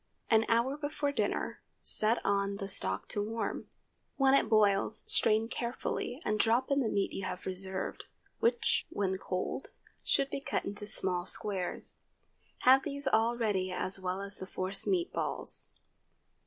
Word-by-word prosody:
An 225 0 +5
hour 235 +5 +2
before 290 -1 -2
dinner, - - -2 0.2
set 220 +2 +6
on 200 0 +1
the 200 -1 -5
stock 95 - 0
to 205 - -1
warm. 225 +2 -3 0.5
When 270 -2 +4
it 275 - +4
boils 210 -1 +3
strain 220 +1 +2
carefully, 245 +1 -3
and 215 0 0
drop 235 +5 +2
in 275 - +3
the 240 -5 +1
meat 200 -2 0
you 195 - -4
have 180 0 -5
reserved, 190 0 -3 0.3
which, 240 +1 +2
when 190 -2 -1
cold, 185 +8 -3 0.4
should 275 -1 +1
be - - -3
cut 280 0 -2
into 205 +1 -5
small 180 -3 -1
squares. 195 -4 -2 0.6
Have 260 +1 +7
these 280 -1 -5
all 235 -1 +2
ready 195 -5 0
as 185 +1 +1
well 185 +1 -3
as 200 0 -5
the 185 - -6
force 190 +1 -3
meat 360 -2 +1
balls. - - -1
215 Hz, 155 wpm, -32 LUFS, 190-250 Hz, 0.6 s, Have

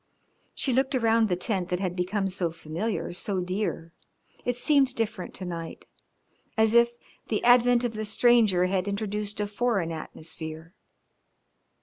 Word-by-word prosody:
She 265 - 0
looked 265 +2 +1
around 225 -2 +3
the 180 - +2
tent 180 -1 -2
that 180 - -1
had 185 -2 -2
become 190 +2 -1
so 185 -2 -1
familiar, 170 +5 -4
so 190 +1 -2
dear. 180 -2 -3 0.5
It 245 - -1
seemed 270 0 +3
different 220 -5 -2
to 185 - -1
night, 165 -2 -6 0.7
as 220 0 +4
if 235 0 +6 0.4
the 215 - -1
advent 245 0 +5
of 240 -2 -1
the 215 0 -4
stranger 215 -4 +4
had 185 +1 -1
introduced 210 0 -2
a 210 - 0
foreign 205 -5 -1
atmosphere. 160 +1 -8
205 Hz, 145 wpm, -27 LUFS, 180-230 Hz, 0.7 s, if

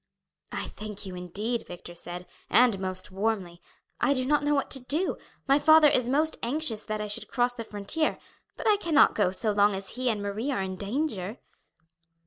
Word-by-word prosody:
"I - - -3
thank 210 -1 -8
you 190 - -7
indeed," 200 +7 -3
Victor 175 0 -9
said, 175 +1 -6 0.2
"and 235 -5 +4
most 185 -1 0
warmly. 190 -4 -2 0.4
I 280 - +2
do 255 -1 0
not 295 +2 +2
know 295 0 +2
what 275 - -1
to 270 - +4
do. 300 +9 0 0.3
My 275 +2 +5
father 315 0 +7
is 250 -3 +2
most 305 +4 +2
anxious 240 -3 0
that 215 -1 -3
I 210 - -3
should 210 - -3
cross 245 -1 +1
the 235 -2 -6
frontier, 215 +9 -1 0.4
but - - -3
I 420 -1 +5
cannot 330 -7 +4
go 205 -4 +2
so 215 +4 -1
long 205 0 +3
as 195 0 -5
he 255 +1 -1
and 215 -3 -1
Marie 205 +6 -3
are 255 -8 -1
in 190 0 -4
danger." 210 - -3
225 Hz, 195 wpm, -27 LUFS, 195-275 Hz, 0.4 s, father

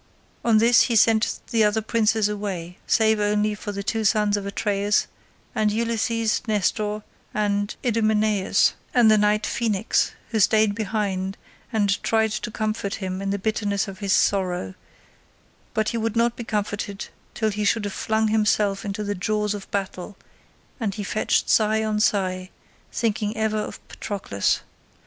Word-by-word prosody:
On 230 -2 +4
this 230 +2 +6
he 235 - +1
sent 220 0 +3
the 225 -2 +3
other 210 +1 +2
princes 220 -1 +2
away, 195 -4 -5
save 220 -1 +3
only 210 0 +1
the 205 -1 -5
two 220 +2 -1
sons 210 -1 +2
of 200 -1 -3
Atreus 205 0 +1 0.5
and 215 -1 +1
Ulysses, 230 0 0
Nestor, 210 0 0 0.3
Idomeneus, 210 -1 +1 0.2
and 235 -3 +6
the 215 - +6
knight 210 +1 +2
Phoenix, 220 -2 0 0.2
who 225 - -1
stayed 215 0 +4
behind 200 -3 -2 0.3
and 205 -4 +1
tried 220 -1 +1
to 215 +2 -3
comfort 215 -2 -2
him 185 -1 -4
in 195 - -2
the 200 - 0
bitterness 205 0 -1
of 195 -1 -8
his 200 -2 -2
sorrow: 180 - +1 1.0
but 220 0 +1
he 235 - -2
would 225 0 -2
not 235 0 +2
be 235 - -6
comforted 205 -2 -3 0.3
till 220 -2 0
he 210 +1 -2
should 210 +1 +1
have 200 - -4
flung 220 0 0
himself 210 -2 +1
into 205 0 -4
the 205 0 -2
jaws 210 +2 -1
of 205 -2 -8
battle, 195 0 -4 0.6
and 210 -5 -2
he 210 - -4
fetched 215 +2 0
sigh 220 0 +3
on 215 -1 0
sigh, 185 -4 0 0.4
thinking 215 -1 -1
ever 220 0 0
of - - -5
Patroclus. 185 - -2
210 Hz, 155 wpm, -24 LUFS, 200-220 Hz, 1.0 s, this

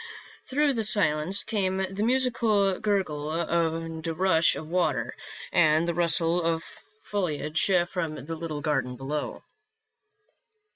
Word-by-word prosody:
Through 290 +1 +1
the 225 -3 -1
silence 185 -3 +3
came 195 -4 -1
the 190 +1 -3
musical 225 -5 +2
gurgle 170 -8 -1
and 165 -1 -2
rush 165 0 +3
of 155 - -7
water, 150 -10 0 0.4
and 155 0 +3
the 170 - 0
rustle 170 0 +2
of 165 -1 -1 0.4
foliage 160 -5 0 0.2
from 165 -4 -3
the 165 +1 -5
little 160 -2 -5
garden 135 -5 -1
below. 140 +4 -5
170 Hz, 115 wpm, -26 LUFS, 155-195 Hz, 0.4 s, silence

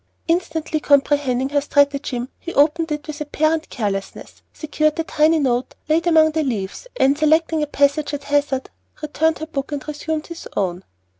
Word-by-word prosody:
Instantly 325 -2 -1
comprehending 275 -3 +2
her 285 0 +1
stratagem, 280 -3 +1
he 345 - -7
opened 320 +3 +3
it 300 0 -3
with 305 -1 -7
apparent 310 +2 0
carelessness, 200 -4 -5
secured 305 0 0
the 325 - -1
tiny 315 +1 +2
note 255 -4 0
laid 325 +3 +1
among 315 -2 +5
the 315 +1 0
leaves, 225 - -4
and, 275 +1 +4
selecting 315 +1 +2
a 300 - 0
passage 285 +1 +1
at 290 -1 -5
hazard, 285 -2 0 0.3
returned 315 +1 +1
her 315 - -5
book 280 -2 -5
and 290 -1 -5
resumed 305 +1 -3
his 335 -1 -9
own. 185 -1 -1
295 Hz, 165 wpm, -20 LUFS, 275-315 Hz, 0.3 s, among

